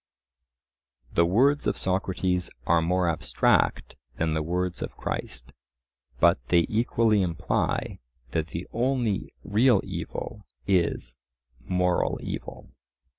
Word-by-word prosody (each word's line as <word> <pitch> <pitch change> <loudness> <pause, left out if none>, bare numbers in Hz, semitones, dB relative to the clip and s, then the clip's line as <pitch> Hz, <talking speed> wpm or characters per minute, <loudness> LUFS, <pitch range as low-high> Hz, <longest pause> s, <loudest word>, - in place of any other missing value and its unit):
The 85 0 +4
words 135 +10 +3
of - - 0
Socrates 95 -1 -1 0.2
are 85 0 +4
more 90 +2 +1
abstract 80 -2 +1 0.2
than 80 -1 0
the 80 - 0
words 90 +3 -2
of - - -5
Christ, 65 0 -5 0.7
but - - +5
they 85 +3 +4
equally 110 -1 +2
imply 85 -4 -1 0.3
that 80 -1 -1
the 85 +2 -5
only 120 -4 0
real 110 +2 +4
evil - - -6 0.2
is 85 -9 0 0.5
moral 90 -1 +1
evil. - - -7
90 Hz, 110 wpm, -26 LUFS, 85-105 Hz, 0.7 s, but